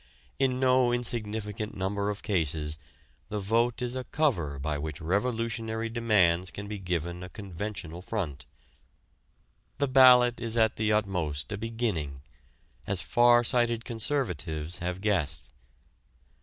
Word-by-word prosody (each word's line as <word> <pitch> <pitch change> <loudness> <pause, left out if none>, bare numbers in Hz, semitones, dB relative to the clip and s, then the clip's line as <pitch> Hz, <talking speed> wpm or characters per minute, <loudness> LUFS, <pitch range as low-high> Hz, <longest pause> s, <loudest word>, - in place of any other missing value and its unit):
In 130 -1 +2
no 130 -1 +4
insignificant 110 -3 -2
number 100 +2 -1
of 105 0 -4
cases 80 -5 0 0.5
the 105 - -3
vote 115 +5 +1
is 125 +1 -3
a 130 - -3
cover 90 - 0
by 70 +2 -2
which 75 0 -5
revolutionary 115 +4 -1
demands 95 -7 +2
can 100 +5 -7
be 105 0 -5
given 85 -1 -3
a 90 - -7
conventional 95 -3 -6
front. 90 -9 -4 1.3
The 140 - +1
ballot 125 -2 +7
is 115 0 -1
at 110 -1 +3
the 110 0 +1
utmost 90 -8 -1
a 105 - -2
beginning, 105 - -3 0.6
as 95 -2 +1
far 120 +5 +4
sighted 120 -1 +1
conservatives 90 - -1
have 90 +1 -3
guessed. 80 - -1
105 Hz, 130 wpm, -28 LUFS, 85-120 Hz, 1.3 s, ballot